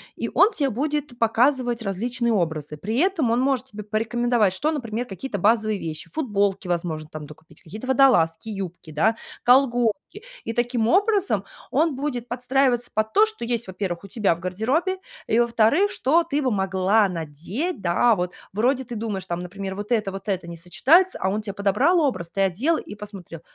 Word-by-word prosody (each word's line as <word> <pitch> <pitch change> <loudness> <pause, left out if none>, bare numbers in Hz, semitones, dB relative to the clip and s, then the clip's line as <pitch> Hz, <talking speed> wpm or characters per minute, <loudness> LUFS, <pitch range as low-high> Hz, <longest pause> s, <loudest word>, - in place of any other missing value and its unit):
и - - -3
он 405 +4 +5
те 280 -9 0
будет 290 +1 -2
показывать 240 +1 +2
различные 235 +4 -1
образы. 160 -6 -2
При 215 +9 -3
этом 330 -9 +2
он 235 - +2
может 260 -1 0
тебе 210 -3 -8
порекомендовать, 225 0 +1
что, 295 +11 0
например, 240 -5 -3
какие-то 205 +2 -5
базовые 215 +1 +2
вещи: 160 -3 -6
футболки, 205 -10 0
возможно, 165 -3 -2
там 155 -1 -7
докупить, 155 +1 -16
какие-то 215 +9 -9
водолазки, 240 -8 +3
юбки, 185 -6 -6
да, 200 +10 +2 0.3
колготки. 245 - +2 0.2
И, 230 - -4
таким 240 -1 0
образом, 400 - +2 0.3
он 315 -2 +2
будет 255 -3 -3
подстраиваться 250 0 +1
под 215 +1 -1
то, 425 - +6
что 435 - -5
есть, 235 -2 -2
во-первых, 185 -2 -4
у - - -9
тебя 200 -4 +1
в - - -13
гардеробе, 245 - -1 0.3
и, 225 - +2
во-вторых, 235 - +3
что 330 +2 +2
ты 300 -3 -1
бы 260 -3 0
могла 195 +1 +2
надеть, 175 - -4
да, 185 +7 +3
вот. 180 -1 -3 0.2
Вроде, 250 +6 +1
ты 240 - -7
думаешь, 210 -4 -3
там, 175 -1 -3
например: 190 +2 -6
"Вот 205 +3 -7
это, 215 -4 +1
вот 195 +3 -8
это 185 -4 -2
не 170 - -7
сочетается". 310 - +3
А 190 - +1
он 210 +3 -1
те 205 -2 -5
подобрал 200 - +2
образ, 190 - -1
ты 195 - -1
одел 220 - +1
и - - -8
посмотрел: 195 -6 -9
220 Hz, 180 wpm, -23 LUFS, 190-260 Hz, 0.3 s, то